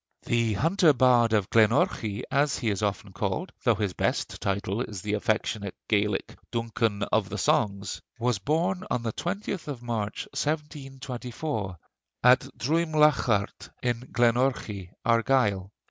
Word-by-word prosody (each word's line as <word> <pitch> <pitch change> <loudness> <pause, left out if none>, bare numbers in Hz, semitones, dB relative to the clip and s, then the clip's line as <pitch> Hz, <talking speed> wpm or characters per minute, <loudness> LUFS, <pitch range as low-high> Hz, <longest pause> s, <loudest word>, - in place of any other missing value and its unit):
The 115 -2 +1
Hunter 165 - +4
Bard 120 -3 +4
of 105 -4 +1
Glenorchy, 110 -2 +2
as 140 0 +2
he 115 -3 0
is 100 - -2
often 105 -1 -2
called, 100 - -2
though 120 -4 +4
his 100 -4 -1
best - - -1
title 100 +2 -1
is 105 -7 -5
the 105 0 -2
affectionate 105 -1 -1
Gaelic 105 -2 0
"Duncan 115 -3 -1
of - - 0
the - - -4
Songs," 100 -1 0 0.2
was 120 -3 0
born 170 - 0
on 125 - -1
the 115 -2 -2
20th 190 -1 -4
of 135 -5 -6
March, 110 -3 -3
1724, 135 - -4 0.5
at 125 +1 +7 0.2
Druimliaghart 150 -8 +2
in 120 -2 0
Glenorchy, 120 -6 +1 0.2
Argyll. 115 -5 +2
115 Hz, 130 wpm, -27 LUFS, 105-135 Hz, 0.5 s, at